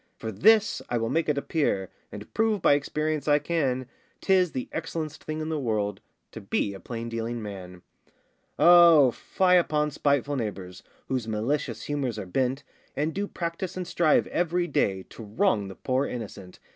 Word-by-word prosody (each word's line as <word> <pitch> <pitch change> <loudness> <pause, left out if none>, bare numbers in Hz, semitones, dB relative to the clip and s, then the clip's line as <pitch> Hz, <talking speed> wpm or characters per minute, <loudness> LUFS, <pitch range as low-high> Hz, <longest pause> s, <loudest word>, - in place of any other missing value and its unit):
For 110 - -5
this 215 - +4
I 120 - 0
will 115 0 -1
make 165 -1 0
it 150 - +1
appear, 140 - -1 0.2
And 105 0 -10
prove 220 -1 +1
by 155 - +4
experience 150 +1 -1
I 145 -1 +5
can, 140 -5 -1 0.3
'Tis 185 -3 +3
the 130 - -4
excellen'st 160 -1 -4
thing 155 0 -4
in 155 - -3
the 155 -1 -1
world 105 -5 -2 0.3
To - - -9
be 100 - -1
a 95 - -9
plain 115 +1 -6
dealing 115 +1 -3
man. 95 -4 -8 0.7
O 170 -6 +7
fie 180 +9 +2
upon 150 -3 0
spiteful 145 -1 0
neighbours, 100 -6 -5 0.3
Whose 125 -4 -2
malicious 115 +1 -2
humours 135 -6 -2
are 105 - -5
bent, 130 +8 -1 0.3
And 155 +3 -1
do 200 +1 -2
practise 170 +1 -4
and 180 - -3
strive 170 -3 +2
every 175 0 0
day 100 - 0
To 115 - -10
wrong 105 - +1
the 95 - -9
poor 130 +6 -1
innocent. 100 -6 -8
140 Hz, 170 wpm, -26 LUFS, 110-165 Hz, 0.7 s, O